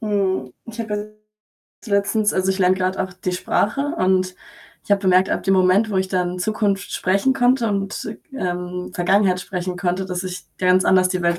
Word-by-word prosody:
mhm. 195 - -1
Ich 230 0 -10
habe 220 -2 -5
ja - - -1 0.9
also, 225 - -10
letztens 205 +1 +2
also, 185 0 +1
ich 190 - -2
lerne 185 0 +3
gerade 185 0 -1
auch 190 - -6
die 185 0 -3
Sprache, 205 +7 0 0.2
und, 185 0 +1 0.5
ich - - -19
habe 200 0 +3
bemerkt, 185 0 +4
ab - - -1
dem 195 - +2
Moment, 190 +4 +3
wo 195 - -1
ich 190 0 -1
dann 180 -1 -1
Zukunft 200 0 -1
sprechen 200 +8 +1
konnte 245 -2 +2
und, 200 +2 -3 0.2
ähm, 180 -5 -4
Vergangenheit 185 +1 +2
sprechen 180 -1 -4
konnte, 180 +1 -1
dass 180 -1 -3
ich 180 0 -6
ganz 185 0 +3
anders 185 -1 +4
die 185 - -1
Welt 170 0 +1
190 Hz, 195 wpm, -21 LUFS, 180-205 Hz, 0.9 s, bemerkt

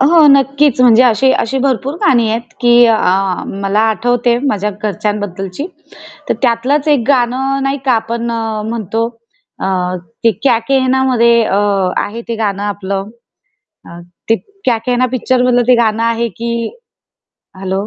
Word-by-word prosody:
अ, 265 - +4
हो, 320 -1 +5
नक्कीच. 275 0 +3
म्हणजे 245 -1 +6
अशी 250 +3 +3
अशी 265 +4 -1
भरपूर 270 +1 -1
गाणी 235 -4 +3
आहेत 230 +1 -4
की 240 -1 +4
अ, 225 -1 +3 0.6
मला 195 +2 +1
आठवते 240 +1 0
माझ्या 210 -4 -1
घरच्यांबद्दलची, 205 - -3 0.6
तर - - +1
त्यातलंच 255 +5 +1
एक 280 -6 +2
गाणं 270 +1 +1
नाही 275 +1 -1
का? 255 - +4
आपण 235 +1 -2
अ, 225 -2 -3
म्हणतो 225 0 -2 0.6
अ, - - -1 0.6
ते 230 - +6
क्या 250 -4 +3
केहनामध्ये 260 -3 +3
अ, 195 - 0 0.5
आहे 225 +3 -7
ते 230 - -2
गाणं 205 -2 -2
आपलं. 200 0 -4 1.2
ते 225 - +5 0.3
क्या 240 -3 +2
केहना 250 0 +1
पिक्चर 255 0 0
मधलं 245 -1 +3
ते 250 - +6
गाणं 225 -1 +1
आहे 230 0 0
की. 235 0 -3 1.1
हेल्लो! 190 +1 -3
235 Hz, 145 wpm, -14 LUFS, 220-260 Hz, 1.2 s, म्हणजे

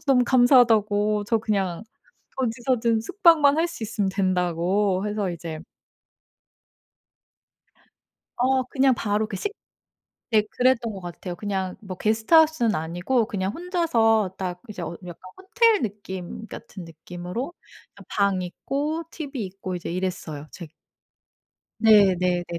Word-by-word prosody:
너무 260 -2 +4
감사하다."고 220 -5 +4
"저 225 +1 +2
그냥 200 -5 -1 0.6
어디서든 235 -2 0
숙박만 305 - +4
할 335 +2 +2
수 285 -9 -6
있으면 210 -2 -1
된다."고 185 +1 0
해서 205 -3 -2
이제 165 -2 -6 2.8
어 260 +1 +2
그냥 265 +1 +2
바로 215 -1 -1
그 195 - -5
식 405 - -3 0.8
네 215 -1 +5
그랬던 245 -1 +1
것 195 - -8
같아요. 175 0 -7
그냥 190 -1 -3
뭐 190 -3 -8
게스트하우스는 230 - +3
아니고 175 +10 0
그냥 190 -2 -2
혼자서 230 - +1
딱 180 -1 -4
이제 200 -4 -8
어 170 0 -5
약간 175 -1 -9 0.2
호텔 445 +3 +2
느낌 200 -2 -6
같은 190 -4 -10
느낌으로 175 - -6 0.4
그냥 - - -15
방 200 -2 +1
있고 285 - -3
tv 280 -9 -5
있고 185 0 -6
이제 175 - -5
이랬어요. 175 -5 -4
제 170 -4 -9 1.1
네네네. 185 -5 +4
210 Hz, 260 characters per minute, -24 LUFS, 185-250 Hz, 2.8 s, 네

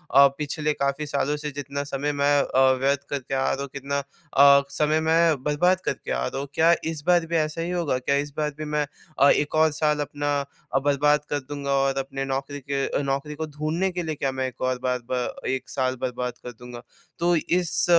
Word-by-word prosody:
अ, 140 0 +9
पिछले 150 0 -1
क़ाफी 140 +2 -1
सालों 145 0 0
से 150 0 -4
जितना 140 0 -4
समय 145 +1 -2
मैं 145 0 +2
अ, 130 - 0 0.2
व्यर्थ 140 +1 +2
करके 135 -2 -4
आ 135 - +1
रहा 135 - -2
हूँ। 140 - -3
कितना 140 +1 -3 0.4
अ, 140 0 +8
समय 150 +2 +1
मैं 160 -3 +3
बर्बाद 180 +5 +2
करके - - -3
आ 60 0 0
रहा 135 - -4
हूँ। 140 - -4
क्या 165 +3 +5 0.2
इस 155 -3 -6
बार 175 -2 +4
भी 165 +1 -3
ऐसा 155 0 0
ही 170 - -2
होगा 170 -7 0
क्या 140 +2 0
इस 145 +1 -1
बार 150 -1 0
भी 155 - -5
मैं 150 0 0 0.3
अ, 140 +2 +7
1 150 +1 +2
और 155 0 +4
साल 150 0 +1
अपना 145 0 -3 0.4
अ, 135 - +4
बर्बाद 145 +1 +2
कर 145 - 0
दूँगा? 140 0 -5
और 135 0 +2
अपने 135 0 -3
नौकरी 135 +1 -3
के 140 0 0
नौकरी 140 +2 -2
को 160 +1 -3
ढूँढने 155 +5 -1
के 175 0 -3
लिए 160 -1 -3
क्या 135 -2 -1
मैं 130 0 -2
एक 130 -1 -11
और 130 -1 0
बार, 125 -1 0
ब 125 -1 -1
1 130 -1 -2
साल 130 -1 -1
बर्बाद 125 -1 -2
कर 125 - -6
दूँगा? 120 0 -10 0.4
तो 175 +1 +3
इस 175 +1 +1
145 Hz, 220 wpm, -25 LUFS, 135-155 Hz, 0.4 s, अ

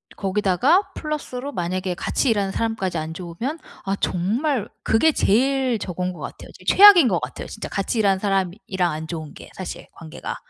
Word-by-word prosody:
거기다가 205 - +2
플러스로 285 -3 -4
만약에 185 -2 -2
같이 255 +7 0
일하는 200 -3 +1
사람까지 195 -6 -2
안 155 +1 -4
좋으면 185 - -5 0.3
아 195 - 0
정말 225 - 0 0.2
그게 310 +9 +4
제일 260 +1 +2
저건 180 0 -3
것 - - -12
같아요. - - -8 0.2
최악인 390 -7 +9
것 180 -7 +1
같아요. 125 0 -6
진짜 - - -7
같이 200 +3 -2
일하는 195 -2 +3
사람이랑 190 -2 -1
안 155 +1 -5
좋은 160 -3 -6
게 - - -12
사실 185 - -7
관계가. 160 -2 -7
195 Hz, 365 characters per minute, -22 LUFS, 180-250 Hz, 0.3 s, 최악인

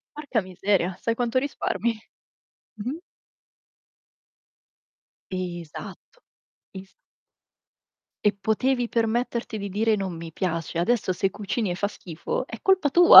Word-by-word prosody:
Porca 280 -8 0
miseria, 185 -1 0
sai 230 - +1
quanto 240 +1 +1
risparmi? 235 -5 0 0.9
Mh-mh. 255 +10 -3 2.3
Esatto. 180 - -6 0.5
Es 190 0 -9 1.3
E 210 - +5
potevi 245 +3 +2
permetterti 230 0 0
di 200 0 -3
dire: 215 +3 +2
"Non 190 -3 -2
mi 165 0 -7
piace." 165 -1 -2
Adesso 195 +1 +2
se 190 +2 +1
cucini 210 0 -2
e - - -2
fa 200 +2 0
schifo 180 - -4
è 225 - -8
colpa 380 -6 +4
tua. 345 +5 +11
210 Hz, 115 wpm, -26 LUFS, 185-245 Hz, 2.3 s, tua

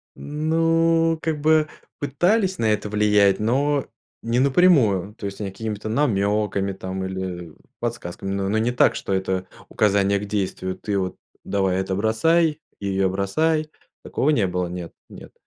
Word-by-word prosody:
Ну, 165 +2 +1
как 155 -2 -2
бы 155 0 +4 0.3
пытались 185 - +1
на 115 - 0
это 105 0 -1
влиять, 105 -2 +3
но 135 +6 +1 0.3
не 115 +1 0
напрямую, 130 - +3
то 105 - -8
есть 100 0 -5
какими-то 105 +1 -5
намеками 105 -5 +1
там 95 0 -5
или 95 -3 -5 0.3
подсказками, 95 -5 -4
но 100 0 -1
но 105 +3 0
не 115 +2 +1
так, 125 - +3
что - - -5
это 95 -1 -1 0.2
указание 100 -1 +2
к 105 - -5
действию: 95 -2 -3
"Ты 105 -2 -2
вот 95 -1 -3 0.3
давай 95 -2 0
это 95 0 -2
бросай 150 - +2 0.2
и 100 - -6
ее 95 -1 +1
бросай". 155 +12 0 0.3
Такого 140 - -1
не 115 -10 +3
было, 90 0 -2
нет, 85 -1 -7 0.2
нет, - - -12
105 Hz, 150 wpm, -23 LUFS, 95-145 Hz, 0.3 s, бы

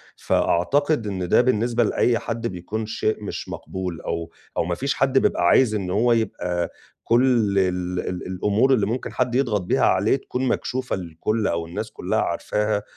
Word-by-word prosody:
فأعتقد 140 - +1
إن 95 -3 -3
ده - - +6
بالنسبة 120 -1 +2
لأي 115 +2 +2
حد 115 0 -3
بيكون 100 +4 -4
شيء 110 0 -2
مش 100 - -5
مقبول 90 -4 -5
أو 85 0 -4 0.3
أو - - +2
ما 85 0 -1
فيش 140 +5 -1
حد 135 0 +2
بيبقى - - +1
عايز 110 -1 +4
إن 95 -3 -2
هو 115 +5 +2
يبقى 90 -6 -1 0.3
كل 115 -5 +3
ال 90 -1 -1
ال 90 0 -4
الأمور 105 +8 +2
اللي 110 -6 +2
ممكن 115 +5 -3
حد 125 -1 0
يضغط 115 -7 +1
بيها 90 - +1
عليك 100 +8 +2
تكون 130 +1 -2
مكشوفة 130 0 -1
للكل 95 +5 -2
أو 85 -1 -1
الناس 105 +6 -5
كُلّها - - -1
عارفاها، 105 -1 -1
105 Hz, 170 wpm, -23 LUFS, 90-120 Hz, 0.3 s, ده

